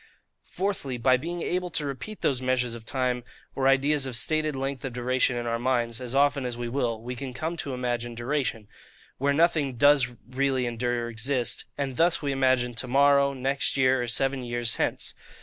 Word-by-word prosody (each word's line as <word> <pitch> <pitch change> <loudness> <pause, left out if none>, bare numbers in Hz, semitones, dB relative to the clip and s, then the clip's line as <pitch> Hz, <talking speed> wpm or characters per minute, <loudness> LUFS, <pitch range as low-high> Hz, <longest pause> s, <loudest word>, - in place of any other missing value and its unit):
Fourthly, 180 -9 -2
by 130 +2 +4
being 170 +6 -4
able 180 0 -1
to 165 -3 -1
repeat 145 +10 -6
those 130 -3 +1
measures 125 -2 0
of 115 -1 -10
time, 125 -2 -1 0.3
or 135 0 +1
ideas 135 +1 +3
of 130 - -3
stated 155 +5 +1
length 135 -1 -3
of 135 -3 -4
duration, 125 +1 +1
in 120 0 -3
our 115 0 -1
minds, 120 -2 0
as 125 +1 -5
often 140 0 +3
as 125 -2 -4
we 120 0 -3
will, 120 -3 -1
we 125 +1 -5
can 130 0 -6
come 160 +6 -3
to 140 -5 -4
imagine 120 -1 -2
DURATION,—WHERE 125 +1 -3
NOTHING 155 -4 +2
DOES 145 0 +5 0.2
REALLY 130 0 0
ENDURE 120 0 -1
OR - - -4
EXIST; 120 +2 -1
and 135 -3 -3
thus 170 +1 +3
we 145 -2 -2
imagine 130 -2 +2
to 120 +2 -2
morrow, 140 +1 +4
next 135 +1 -1
year, 130 -1 +3
or 120 - -2
seven 135 +2 0
years 120 -1 0
hence. - - -1
130 Hz, 190 wpm, -27 LUFS, 120-140 Hz, 0.3 s, DOES